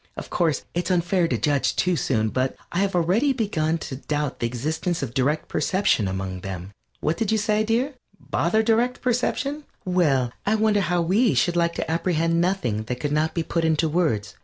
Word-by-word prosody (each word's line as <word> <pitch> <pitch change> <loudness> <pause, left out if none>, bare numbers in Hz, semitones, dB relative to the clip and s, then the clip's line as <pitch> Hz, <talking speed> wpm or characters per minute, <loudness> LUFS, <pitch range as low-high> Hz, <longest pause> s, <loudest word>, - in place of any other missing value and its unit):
Of - - -7
course, 160 -5 0
it 175 +1 -1
is - - -3
unfair 175 0 +2
to - - 0
judge 145 -3 +1
too 180 0 +1
soon, 110 -7 0
but 130 +3 -1 0.2
I 175 - -1
have 195 -1 +1
already 195 - +2
begun 165 -10 0
to 130 - -6
doubt 150 0 -3
the 120 - 0
existence 155 +7 -2
of 120 -4 -4
direct 140 +4 0
perception 190 - +1
among 95 -1 -4
them. 95 0 -6 0.3
What 155 +2 0
did 225 -3 0
you 220 - +3
say, 215 0 +1
dear? 240 +6 0 0.3
Bother 215 +7 +1
direct 235 +3 +1
perception? 265 +4 0 0.2
Well, 150 -10 +2
I 215 - +2
wonder 215 -1 +2
how 175 -1 +1
we 205 +8 +3
should 175 -5 +2
like 170 -1 +1
to 160 - -2
apprehend 165 0 +1
nothing 175 - 0
that 125 +2 -4
could 145 +1 -2
not 155 +2 0
be 165 - 0
put 165 +1 -1
into 160 0 +2
words? 150 - 0
170 Hz, 200 wpm, -24 LUFS, 140-200 Hz, 0.3 s, you